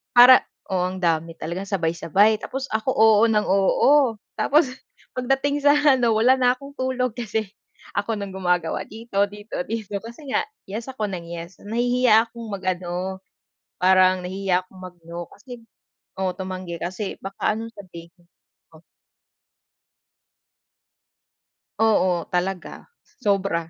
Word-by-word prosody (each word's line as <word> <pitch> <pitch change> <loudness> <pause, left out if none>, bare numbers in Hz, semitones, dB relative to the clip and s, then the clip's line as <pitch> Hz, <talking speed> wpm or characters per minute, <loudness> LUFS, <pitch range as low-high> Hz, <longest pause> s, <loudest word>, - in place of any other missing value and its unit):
para 250 +1 +9 0.3
oo, 185 -1 0
ang 185 +1 -5
dami, 165 -1 0
talagang 175 +5 -5
sabay-sabay. 190 +3 +2
Tapos 270 0 -5
ako, 220 +3 -1
oo 220 -1 +5
ng 215 -1 +3
oo. 235 +7 +4 0.2
Tapos 295 -1 +3 0.5
pagdating 270 +3 0
sa 290 - +7 0.2
ano, 240 -3 +2
wala 245 +4 +4
na 250 -1 +4
akong 275 +2 -12
tulog 255 -2 -1
kasi 220 -3 -3 0.5
ako 205 +3 0
ng 200 -1 -5
gumagawa 180 -3 0
dito 225 -1 -9
dito 205 -1 -6
dito. 215 -3 -4
Kasi 235 +6 -11
nga - - +2 0.3
yes 220 +4 -5
ako 220 -5 -3
nang 175 -3 -6
yes. 170 +1 -8
Nahihiya 235 0 +3
akong 230 0 -9
mag 195 - -5
ano, 185 +1 -3 0.6
parang 185 0 +4
nahihiya 185 -1 0
akong 185 0 -16
mag-no 175 -1 -8
kasi 245 -2 -12 0.6
oo, 185 -1 +1
tumanggi 185 -2 -5
kasi 185 +3 -4
baka 195 +2 -1
anong 230 +1 -7
sabihin. 175 -3 -13 0.5
Oh. - - -16 3.0
Oo, 185 -6 +2
talaga, 180 - -3 0.3
sobra. 195 -6 0
200 Hz, 130 wpm, -23 LUFS, 180-235 Hz, 3.0 s, para